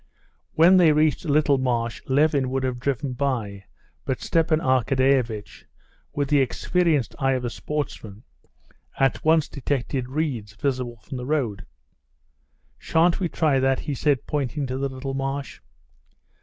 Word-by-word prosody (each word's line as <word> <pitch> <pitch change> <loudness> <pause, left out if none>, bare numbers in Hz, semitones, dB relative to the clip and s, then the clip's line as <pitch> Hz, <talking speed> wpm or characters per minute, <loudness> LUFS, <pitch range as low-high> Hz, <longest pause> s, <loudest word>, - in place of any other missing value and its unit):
When 175 +4 +6
they 165 -4 +6
reached 155 +2 +1
a 150 - 0
little 145 -2 +3
marsh 120 -3 -1
Levin 140 -1 +2
would 135 0 -2
have 125 -2 -2
driven 135 +1 -2
by, 115 -8 -3 0.4
but 130 - -2
Stepan 165 -1 +1
Arkadyevitch, 130 - 0 0.5
with 145 -1 -1
the 145 +1 +3
experienced 155 +1 0
eye 135 -1 +2
of 125 -1 -2
a 120 - -3
sportsman, 115 -9 -5 0.7
at 135 -1 +1
once 160 -1 +3
detected 135 -2 -3
reeds 130 -8 -3
visible 125 -1 -2
from 130 - -7
the 125 - -5
road. 120 -11 -1 1.1
"Shan't 165 +2 +2
we 180 -3 -1
try 150 -5 +1
that?" 135 0 +1
he 145 - -3
said, 140 0 0
pointing 145 0 -2
to 130 0 -4
the 140 0 -1
little 135 +1 -5
marsh. 135 +1 -4
135 Hz, 145 wpm, -24 LUFS, 125-150 Hz, 1.1 s, When